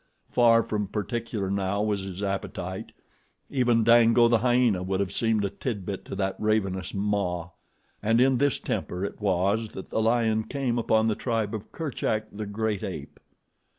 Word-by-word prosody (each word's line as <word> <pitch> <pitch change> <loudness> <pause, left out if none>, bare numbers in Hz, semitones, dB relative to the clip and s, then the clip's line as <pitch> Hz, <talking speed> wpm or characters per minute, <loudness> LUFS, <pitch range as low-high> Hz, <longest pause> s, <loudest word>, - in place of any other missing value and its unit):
Far 115 -1 +5
from 105 -2 -2
particular 105 -1 -3
now 100 +1 0
was 105 -2 0
his 95 +1 -6
appetite. 95 -1 -4 0.6
Even 120 -4 +3
Dango, 115 +1 +6
the 115 -1 +3
hyena, 120 -5 +3
would 95 +1 -1
have 100 -2 -1
seemed 110 -3 +1
a - - 0
tidbit 100 -3 -4
to - - -6
that 95 -1 -1
ravenous 95 -4 0
maw. 100 -4 -1 0.5
And 115 +2 +2
in 130 0 +4
this 145 0 +2
temper 90 +2 -3
it 100 - -7
was 100 +3 +1
that 95 - -8
the 110 - +1
lion 110 -1 +2
came 130 -4 -1
upon 110 -1 +2
the 110 - +2
tribe 110 -2 -2
of 110 -1 -6
Kerchak, 110 -8 -2
the 105 0 -6
great 105 -1 -2
ape. - - -6
110 Hz, 165 wpm, -26 LUFS, 100-115 Hz, 0.6 s, Dango